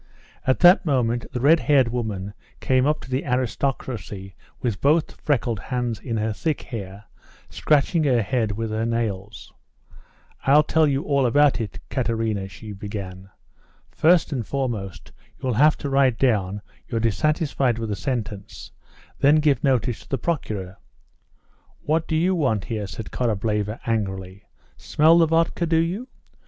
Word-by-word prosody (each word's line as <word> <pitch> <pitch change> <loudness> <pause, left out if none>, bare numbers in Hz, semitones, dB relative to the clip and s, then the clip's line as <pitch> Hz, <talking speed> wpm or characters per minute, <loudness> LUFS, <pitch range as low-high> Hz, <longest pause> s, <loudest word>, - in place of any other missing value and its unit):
At 130 - +2
that 175 +2 +7
moment 120 - 0
the 125 - -3
red 155 +6 +5
haired 140 -6 +3
woman 105 -5 -4 0.3
came 130 +1 +2
up 150 0 0
to - - -12
the 130 +2 0
"aristocracy" 125 -5 -3 0.3
with 115 -6 -2
both 155 +3 +1
freckled 120 -7 0
hands 120 -1 -3
in 115 -4 -4
her 110 0 -1
thick 155 +7 -2
hair, 100 -4 -7 0.5
scratching 155 +2 +2
her 125 -5 +3
head 110 -1 -1
with 110 +1 -4
her 110 +1 -1
nails. 110 -3 -3 0.9
"I'll 145 +3 +5
tell 160 0 +2
you 140 0 0
all 140 -3 +2
about 145 0 +3
it, 105 -4 -5
Katerina," 115 -6 -1
she 105 +2 -10
began. 95 -2 -7 0.6
"First 170 +1 +3
and 125 -4 -2
foremost, 115 -7 -4 0.3
you'll 130 -2 -2
have 150 +7 +4
to 145 - -4
write 135 -3 +3
down 105 -6 0 0.2
you're 115 - -2
dissatisfied 135 +1 +1
with 115 -1 -4
the 105 - -1
sentence, 110 -6 -5 0.5
then 145 +2 +5
give 150 -5 +2
notice 125 -5 +1
to - - -17
the 135 - 0
Procureur." 105 - -3 1.1
"What 160 +2 0
do 160 - -1
you 175 +4 +2
want 130 - 0
here?" 110 -4 -4
said 100 +4 -8
Korableva 105 -1 -1
angrily; 95 -3 -3 0.3
"smell 160 +3 +4
the 165 - +5
vodka, 165 +1 +1
do 165 0 +2
you? 180 +10 -1
120 Hz, 150 wpm, -23 LUFS, 105-145 Hz, 1.1 s, that